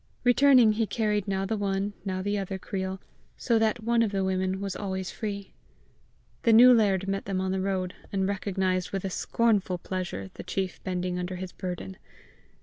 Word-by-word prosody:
Returning, 250 -2 +6
he 220 +1 0
carried 210 -3 0
now 195 0 -1
the 220 +3 -1
one, 200 0 -1
now 185 -1 -3
the 205 +1 0
other 195 -1 -3
creel, 190 0 -4 0.4
so 230 -3 +2
that 220 +1 +1
one 235 +1 +2
of 220 -3 +1
the 195 -1 0
women 190 0 0
was 195 -1 -4
always 190 -2 -3
free. 200 -3 -5 0.9
The 230 - +3
new 250 +3 +9
laird 195 -4 +2
met 195 0 -2
them 190 -1 -2
on 190 0 -1
the 190 0 -1
road, 185 -1 -1 0.2
and 190 -1 0
recognized 190 -2 -1
with 195 -1 -3
a 190 - -2
scornful 205 -4 +1
pleasure 175 - -5
the - - -8
chief 190 -2 -3
bending 180 -1 -2
under 180 +1 -3
his 185 0 -6
burden. 185 0 -6
195 Hz, 185 wpm, -27 LUFS, 185-210 Hz, 0.9 s, new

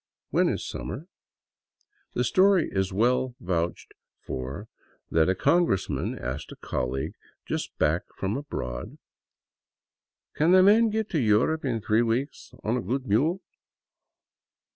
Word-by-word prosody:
"When - - +3
is - - -3
summer?" 90 - -6 1.1
The 125 - +2
story 185 - +4
is 95 0 0
well 125 +5 +1
vouched 85 -5 -2 0.3
for 65 - -5 0.4
that 80 +1 +3
a 95 - +2
congressman 95 - +1
asked 65 +4 -5
a - - -8
colleague 65 +2 -3 0.3
just - - -4
back - - +1
from 95 +2 -1
abroad, 65 - -5 0.7
" - - -67
Can 165 +5 +5
a 185 - +7
man 220 +4 +6
get 220 0 -1
to 160 - +1
Europe 120 +7 +2
in 120 -5 -1
three 110 +2 +2
weeks 120 +4 -2
on 115 +3 0
a - - -1
good 130 +7 -2
mule 150 - +2
115 Hz, 135 wpm, -27 LUFS, 90-155 Hz, 1.1 s, a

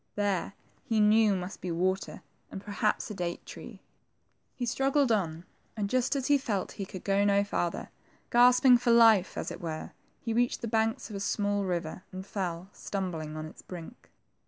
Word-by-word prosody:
There, 200 -2 -1 0.3
he 225 -2 0
knew, 210 -1 +5
must 180 +2 -6
be 180 - -4
water, 185 +3 -1 0.3
and - - -6
perhaps 210 +2 -1
a - - -4
date 175 -3 -4
tree. - - -10 0.7
He 250 - -3
struggled 270 +2 +2
on, 170 -5 -1 0.3
and 205 -1 -2
just 255 +2 +1
as 270 -2 -1
he 285 0 +4
felt 205 -8 -2
that - - -13
he 195 - -4
could 185 -3 -9
go 200 0 +2
no 200 0 +3
farther, 175 -4 -2 0.4
gasp 245 +2 +5
ing 250 -2 +8
for 245 - -1
life, 225 -5 +5
as - - -3
it - - -8
were, 160 -2 -5 0.3
he 230 - -3
reached 245 +2 +1
the 235 - -3
banks 220 0 0
of - - -6
a - - -3
small 205 0 0
river, 175 -1 -3
and 185 0 -7
fell, 185 -3 -4
stumbling, 165 -6 -4
on 155 - -5
its 155 - -11
brink. 180 +6 -10
200 Hz, 190 wpm, -29 LUFS, 180-230 Hz, 0.7 s, ing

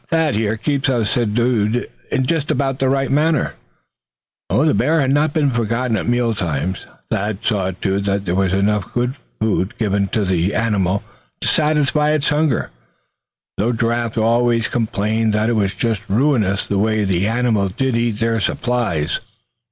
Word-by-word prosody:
Thad, 160 -2 +2
here, 110 +1 0
keeps 140 +3 0
us 120 -5 +1
subdued 115 0 +1 0.4
just 150 +2 -1
about 135 -2 0
right." 135 0 +2
The 145 - -2
bear 155 +6 +2
had 135 -2 +2
not 145 +2 +2
been 145 -2 +1
forgotten 115 0 0
at 100 - -2
meal 120 -1 +1
times. 90 -1 -3 0.2
Thad 105 0 -2
saw 100 -4 +1
to 95 +1 -2
it 100 - -3
that 100 0 -1
there 90 - -1
was 95 0 +1
enough 100 +1 0 0.4
food 105 -3 0
given 100 -3 0
to 105 +1 -1
the 90 +1 0
animal 100 -4 0 0.4
to - - 0
satisfy 150 0 +2
its 150 -2 +1
hunger; 150 -4 0 0.9
though 115 +5 +1
Giraffe 115 0 -1
always 115 +1 +2
complained 110 -1 0
that 105 +2 +1
it - - +1
was 100 -3 0
just 110 0 -2
ruinous 105 -4 +1
the 100 - -1
way 110 +1 +1
that 95 -1 0
animal 110 +1 +1
did 130 +6 -1
eat 115 -1 +1
into - - -10
their 115 0 +1
supplies. 105 -10 -1
115 Hz, 160 wpm, -19 LUFS, 100-130 Hz, 0.9 s, Thad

